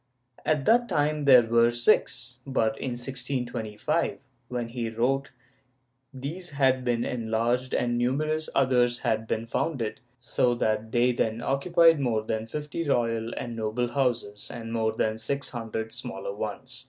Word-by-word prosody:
At 150 -3 +1
that 240 +2 +4
time 150 0 +1
there 130 -3 +8
were 115 +1 +4
six, 120 0 +1
but 115 -5 0
in 130 - -3
1625, 125 +1 -2 0.3
when 120 -2 -3
he 115 -1 -3
wrote, 130 +5 0 0.8
these 150 +7 -6
had 130 -3 +2
been 120 -1 0
enlarged 120 +2 0
and 120 -1 +1
numerous 155 +5 0
others 125 -2 +3
had 110 0 0
been 110 +1 -1
founded, 115 -2 -2 0.2
so 120 0 +1
that 110 -1 -1
they 120 +1 +3
then 115 -2 -1
occupied 165 +4 +4
more 115 -5 0
than 110 0 -3
fifty 150 +5 -4
royal 115 -2 +1
and 120 -1 -4
noble 115 +2 -1
houses 120 -6 -1
and 115 -1 -6
more 110 -1 +1
than 110 0 -1
six 140 +5 -2
hundred 110 -2 -4
smaller 110 -5 -5
ones. 115 +5 -5
120 Hz, 145 wpm, -27 LUFS, 115-135 Hz, 0.8 s, there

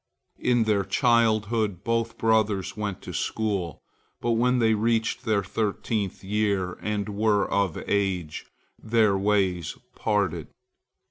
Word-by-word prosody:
In 120 -2 +2
their 105 -3 +1
childhood, 110 -5 +1
both 115 +1 -1
brothers 110 -4 +1
went 105 -3 -4
to - - -7
school, 100 -7 -2 0.4
but 120 - -1
when 125 +2 +2
they 115 -2 +3
reached 115 +1 0
their 105 -2 +1
thirteenth 105 0 -2
year, 100 -2 0
and 105 -1 -2
were 105 -1 +1
of 100 -5 0
age, 95 -6 -1 0.3
their 110 -3 +3
ways 95 -4 0 0.2
parted. 100 -7 -1
105 Hz, 120 wpm, -26 LUFS, 100-110 Hz, 0.4 s, they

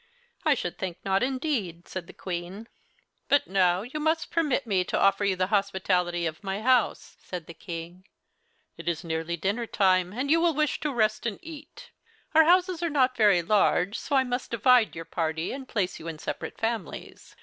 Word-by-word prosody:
"I 305 -2 +4
should 175 -8 -5
think 185 -3 -4
not, 195 0 +2
indeed," 250 - -2
said 185 -2 -6
the - - -10
Queen. 185 +4 -6 0.6
"But 285 0 +4
now 185 -1 +2
you 260 +6 -6
must 315 +1 0
permit 300 -5 +1
me 195 -5 +1
to - - -2
offer 195 +1 +3
you 200 -2 +2
the 185 0 +1
hospitality 185 -3 +1
of 160 +4 -4
my 195 0 -3
house," 250 -2 +1
said 180 -3 -7
the 170 - -10
King. 170 +2 -8 0.7
"It 170 0 -3
is 170 +1 -3
nearly 165 +1 -3
dinner 205 +7 -1
time, 185 -3 +2
and 260 +7 -2
you 330 +1 +5
will 335 -3 +2
wish 305 0 0
to 300 - -2
rest 215 -2 +1
and 215 - -3
eat. 310 -2 -11 0.4
Our 320 0 +7
houses 360 0 +3
are 340 - 0
not 260 -4 +2
very 205 -6 +4
large, 200 0 +2
so 285 - -2
I 265 - +5
must 245 0 -3
divide 240 0 +4
your 165 0 -6
party 160 0 -2
and 265 -1 -7
place 195 -4 -1
you 165 - -9
in 165 -2 -5
separate - - -5
families. 225 -5 -5
200 Hz, 195 wpm, -27 LUFS, 180-260 Hz, 0.7 s, Our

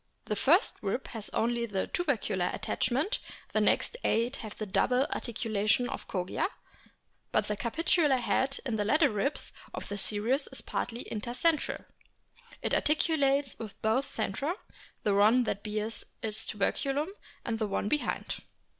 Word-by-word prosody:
The 210 - -1
first 325 - +5
rib 205 +6 -2
has 220 -3 -5
only 235 +1 0
the 195 -3 -1
tubercular 230 - 0
attachment; 275 - 0 0.3
the - - +3
next - - +2
eight 240 +4 +2
have 215 -2 -8
the 215 - -3
double 250 +6 +3
articulation 220 0 +1
of - - -5
Kogia, 180 - -1 0.8
but - - +3
the 210 - 0
capitular 295 - +2
head 265 +2 +1
in 235 -4 0
the 210 - +1
latter 295 +7 +4
ribs 210 +7 -1 0.2
of - - -6
the 205 0 -2
series 225 +8 +1
is 265 - -1
partly 235 0 -3
inter 225 +2 -3
centralit 310 +4 +1 0.9
articulates 285 -3 +2
with 215 -3 -7
both 225 +6 +2
centra, 275 - -1 0.5
the 205 - +3
one 215 +5 +6
that 205 -3 -2
bears 215 +1 -3 0.2
its 220 0 -3
tuberculum 275 - 0 0.4
and 225 -2 -1
the 215 - +1
one 200 0 -1
behind. 295 +6 -1
235 Hz, 145 wpm, -30 LUFS, 210-275 Hz, 0.9 s, one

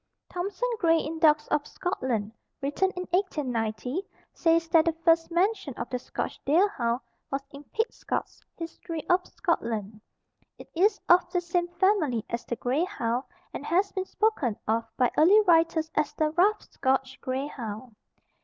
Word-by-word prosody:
Thompson 390 +6 -2
Gray 330 -4 +4
in 320 0 -3
"Dogs 305 -2 +4
of 295 -1 0
Scotland," 245 - -2 0.3
written 290 +8 +1
in 360 - -3
1890, 255 - -1 0.3
says 330 -1 +2
that 325 -1 +5
the 330 - +2
first 330 -1 +4
mention 365 - 0
of 235 - -6
the 250 - -1
Scotch - - -5
deer 340 +8 +4
hound 240 - -1 0.3
was 275 0 -2
in 280 +1 -10
"Pitcotts 450 - -3 0.2
History 330 -1 -6
of 360 +1 +3
Scotland." 225 - -2 0.6
It - - -13
is 400 +5 +3
of 355 +1 +5
the 355 - +2
same 345 0 -1
family 350 - +1
as 235 - -2
the 240 - -3
grey 255 +7 0
hound 250 - -2 0.3
and - - -5
has 370 +6 +1
been 380 -1 -3
spoken 380 - 0
of 225 +1 +1
by 250 -2 +3
early 370 +8 +7
writers 330 -3 +3
as 300 -1 +1
the 310 -1 +1
Rough 395 +6 +3
Scotch 265 0 -1
Grey 260 +1 -2
Hound. 230 -4 -7
320 Hz, 160 wpm, -27 LUFS, 255-360 Hz, 0.6 s, early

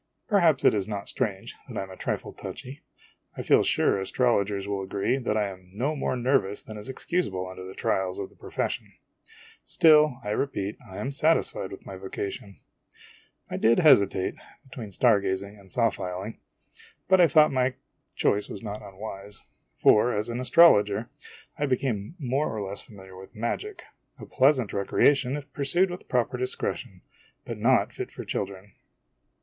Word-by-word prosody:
Perhaps 170 - +3
it - - +7
is 100 -2 -1
not 100 -2 -5
strange 105 -7 -3
that - - -7
I - - -1
am 95 - -10
a - - -9
trifle - - -3
touchy; 135 +4 -8 0.6
I - - -4
feel - - +5
sure - - +2
astrologers 100 -2 0
will 100 -1 -2
agree 100 +7 -1
that 110 -4 -1
I 105 -1 +1
am 95 -1 -12
no 140 +8 -1
more 135 - -1
nervous 120 -5 +1
than 110 - -9
is 105 +5 -8
excusable 130 - -2
under 95 0 -9
the 95 +1 -9
trials 95 -1 -1
of 100 - -5
the - - -22
profession. - - -4 0.7
Still, 150 -5 +5
I 105 - -3
repeat, 105 -4 -2
I 95 - -9
am 135 - -3
satisfied 145 -9 +1
with 95 - -10
my 95 - -8
vocation. 100 +1 -6 1.0
I - - -2
did 115 +1 +4
hesitate 100 - +4 0.3
between 115 -6 -8
star 110 +2 +4
gazing 100 +1 -3
and 95 -1 -17
saw 115 +2 +2
filing; 95 +5 -6 0.7
but 190 -1 +5
I 170 - +7
think 155 +1 +5
my 130 -1 +1 0.4
choice 105 +1 +1
was 100 - -8
not 105 -1 -5
unwise; 100 +1 -9 0.3
for, 105 +2 +4
as 105 +3 -2
an 120 +1 -3
astrologer, 115 -6 +5 0.5
I 145 - +1
became 130 - -1
more 140 -1 -1
or 105 -3 -4
less 100 +1 -4
familiar 95 -3 -14
with 95 +1 -13
magic, 380 - -4 0.4
a - - -8
pleasant 130 -4 +2
recreation 135 +7 +2
if 145 - -10
pursued 175 +7 +1
with 180 - -9
proper 125 -2 0
discretion, 125 - -3 0.4
but - - -6
not - - +3
fit - - -5
for - - -8
children. 100 +1 -5
110 Hz, 170 wpm, -26 LUFS, 100-135 Hz, 1.0 s, it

